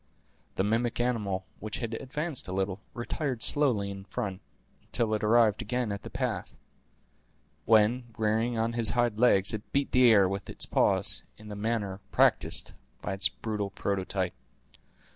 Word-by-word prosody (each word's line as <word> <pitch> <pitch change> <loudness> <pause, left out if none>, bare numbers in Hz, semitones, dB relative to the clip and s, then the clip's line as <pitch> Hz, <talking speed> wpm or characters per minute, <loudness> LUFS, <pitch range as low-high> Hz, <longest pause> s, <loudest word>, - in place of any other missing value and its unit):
The 95 - +1
mimic 115 +4 0
animal, 105 -6 -1
which 110 -1 -4
had 115 -1 -4
advanced 140 +5 -4
a - - -5
little, 95 0 -1 0.2
retired 125 +1 -3
slowly 120 -9 +2
in 100 - -7
his 95 - -14
front, 95 -1 -3 0.4
until 115 -3 -1
it 105 - -1
arrived 110 -1 +4
again 125 -3 -2
at 100 -1 -4
the - - -8
pass, - - -3 1.1
when, 115 +3 +4
rearing 110 +2 +1
on 115 +1 0
his 115 -1 +3
hinder 120 -3 0
legs, 100 -5 +5
it 105 0 -6
beat 140 0 0
the 125 -1 +6
air 100 -4 +6
with 100 +1 -4
its - - -2
paws, - - +1 0.2
in 110 0 -12
the 105 - -6
manner 105 -2 -2
practised - - +2 0.3
by 100 - -2
its 100 +3 +3
brutal 105 -3 -4
prototype. 95 -2 -2
110 Hz, 160 wpm, -29 LUFS, 100-120 Hz, 1.1 s, the